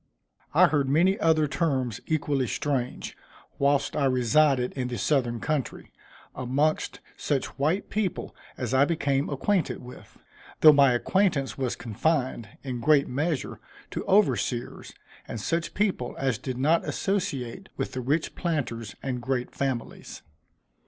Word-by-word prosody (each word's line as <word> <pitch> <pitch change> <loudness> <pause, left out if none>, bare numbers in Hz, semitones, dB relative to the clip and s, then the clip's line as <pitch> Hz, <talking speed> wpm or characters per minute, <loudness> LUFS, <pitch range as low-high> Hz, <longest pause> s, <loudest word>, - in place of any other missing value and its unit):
_" - - -34
I - - +8
heard 140 -3 +1
many 180 +7 +3
other 160 -2 +3
terms 135 - -1
equally 145 -4 0
strange, 130 -1 -2 0.4
whilst 140 0 +2
I 145 - +1
resided 130 +1 +3
in 130 -2 -2
the 125 -1 -4
southern 120 -6 +1
country, 150 -1 -3 0.4
amongst 140 +5 0 0.2
such 140 -1 -2
white 160 +8 0
people 205 -3 -2 0.2
as - - -3
I 130 +1 +5
became 145 -3 0
acquainted 175 +6 0
with; 125 +1 -13 0.4
though 155 -1 +10
my 140 -3 +5
acquaintance 145 0 +1
was 130 -3 -2
confined, 125 0 -1
in 130 -3 -4
a - - -6
great 145 +3 +4
measure, 145 +2 -2 0.3
to - - -3
overseers, 185 - +1 0.4
and 115 - -5
such 165 +10 -2
people 195 -11 0
as 135 -5 0
did 130 -2 -4
not 155 +6 +3
associate 190 -5 -2
with 135 - -2
the 130 - -4
rich 145 +6 0
planters 120 - -3
and 125 -2 -3
great 125 0 -2
families. 130 -4 -4
140 Hz, 140 wpm, -26 LUFS, 125-155 Hz, 0.4 s, though